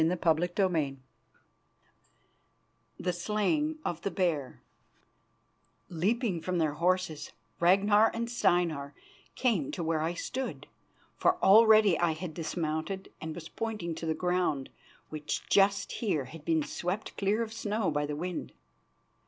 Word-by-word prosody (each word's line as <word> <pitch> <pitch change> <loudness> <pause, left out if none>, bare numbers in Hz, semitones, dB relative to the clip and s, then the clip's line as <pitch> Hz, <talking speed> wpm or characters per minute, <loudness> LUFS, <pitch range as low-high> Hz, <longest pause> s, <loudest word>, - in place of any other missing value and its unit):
CHAPTER 170 0 +2 0.2
II 150 -6 -1 2.0
THE 180 0 -1
SLAYING 215 - 0
OF 170 -1 -2
THE - - -1
BEAR 165 -9 -1 1.3
Leaping 190 +2 0
from 180 +1 -2
their 155 -3 +1
horses, 175 -1 -1 0.3
Ragnar 200 +5 +5
and 235 +1 -3
Steinar 170 -11 0 0.4
came 215 - +1
to 175 - -4
where 160 -1 0
I 165 +2 -1
stood, 260 +9 -4 0.5
for 365 0 +3
already 215 -3 +7
I 170 -2 +2
had 160 +1 -6
dismounted 160 +3 -3
and 160 0 -5
was 165 -2 -8
pointing 215 -7 -4
to 165 +1 -5
the 160 - 0
ground, 180 -7 0 0.4
which 150 -1 -4
just 200 0 +3
here 175 - -1
had 155 +4 -11
been 160 -2 +2
swept 180 +7 -4
clear 205 +3 +1
of 225 -1 -7
snow 210 -4 -1
by 145 0 -1
the 150 - -3
wind. 175 +3 -5
175 Hz, 130 wpm, -30 LUFS, 160-205 Hz, 2.0 s, already